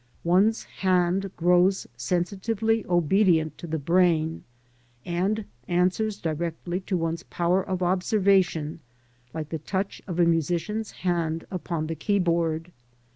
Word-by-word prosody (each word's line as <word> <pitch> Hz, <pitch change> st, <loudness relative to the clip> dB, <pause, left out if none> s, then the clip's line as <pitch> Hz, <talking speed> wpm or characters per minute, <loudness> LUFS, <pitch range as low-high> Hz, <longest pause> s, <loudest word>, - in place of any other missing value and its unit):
One's 195 Hz, +6 st, +3 dB
hand 185 Hz, +1 st, +1 dB
grows 180 Hz, +3 st, +3 dB
sensitively 200 Hz, -, 0 dB
obedient 175 Hz, -2 st, +3 dB
to 170 Hz, -, -7 dB
the 160 Hz, 0 st, -2 dB
brain, 165 Hz, 0 st, +2 dB, 0.6 s
and 195 Hz, +5 st, -1 dB, 0.2 s
answers 185 Hz, +4 st, +1 dB
directly 170 Hz, +1 st, -3 dB
to 190 Hz, -1 st, -2 dB
one's 165 Hz, 0 st, -2 dB
power 180 Hz, +1 st, 0 dB
of 185 Hz, -1 st, -3 dB
observation, 185 Hz, -4 st, +2 dB, 0.5 s
like 155 Hz, 0 st, -5 dB
the 160 Hz, -, -3 dB
touch 190 Hz, +5 st, -3 dB
of 175 Hz, -2 st, -4 dB
a 175 Hz, -, +6 dB
musician's 170 Hz, +6 st, 0 dB, 0.2 s
hand 165 Hz, -2 st, 0 dB
upon 170 Hz, -3 st, -3 dB
the 160 Hz, -, -3 dB
keyboard. 170 Hz, -2 st, 0 dB
175 Hz, 120 wpm, -26 LUFS, 165-190 Hz, 0.6 s, a